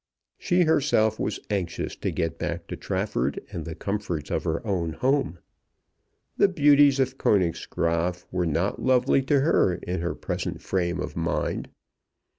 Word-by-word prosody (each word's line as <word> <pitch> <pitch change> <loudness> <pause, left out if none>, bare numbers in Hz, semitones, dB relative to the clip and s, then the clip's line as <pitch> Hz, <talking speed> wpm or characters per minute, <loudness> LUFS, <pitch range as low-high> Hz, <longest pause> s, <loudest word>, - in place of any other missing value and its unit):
She 180 -1 +2
herself 135 -9 +2
was 105 - -2
anxious 95 -5 -2
to - - -2
get 80 -1 -2
back - - -3
to - - -4
Trafford 65 +3 -2
and 80 - -5
the 80 - -6
comforts 100 -7 -3
of - - -1
her 80 +7 -2
own 85 -6 -1
home. 130 - 0 1.0
The - - +5
beauties 145 -5 +5
of 130 0 0
Königsgraaf 85 -1 0
were 90 -1 0
not 85 +6 -1
lovely 130 +1 +3
to 135 +1 +2
her 135 - +3
in 90 0 -4
her 85 - -2
present - - -4
frame 90 -2 -1
of - - -4
mind. 85 0 -2
95 Hz, 150 wpm, -26 LUFS, 85-135 Hz, 1.0 s, The